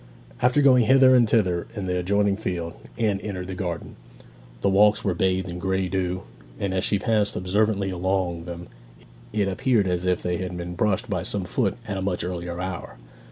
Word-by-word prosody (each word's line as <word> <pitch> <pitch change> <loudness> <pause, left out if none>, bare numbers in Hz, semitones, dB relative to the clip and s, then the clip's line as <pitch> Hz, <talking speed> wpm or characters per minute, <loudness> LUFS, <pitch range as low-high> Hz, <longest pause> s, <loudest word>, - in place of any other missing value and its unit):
After 125 +4 +3
going 125 -4 +6
hither 130 +1 +6
and 120 -3 +5
thither 90 -7 +2
in 100 -3 -4
the 90 -1 -1
adjoining 100 +2 +2
field, 90 -5 -4 0.2
Anne 105 -4 +1
entered 95 -3 -5
the - - -3
garden. 90 -3 -5 0.6
The - - +2
walks 105 +2 +4
were 95 - +2
bathed 95 +1 0
in 90 0 -6
grey 95 0 0
dew, 95 -1 -2 0.4
and 100 -2 -1
as 95 - 0
she 100 - +2
passed 105 +1 +1
observantly 100 +1 +1
along 90 -2 -1
them 85 0 -7 0.7
it 105 -2 0
appeared 105 +2 +2
as 90 0 -1
if 90 -1 +1
they 90 -1 -1
had 90 0 -4
been 90 0 -5
brushed 105 +5 0
by 95 -5 -1
some 100 +1 -2
foot 100 +1 0
at 100 -2 -3
a - - -3
much 95 -2 -1
earlier 90 -1 -4
hour. 90 -8 -5
95 Hz, 195 wpm, -24 LUFS, 90-105 Hz, 0.7 s, going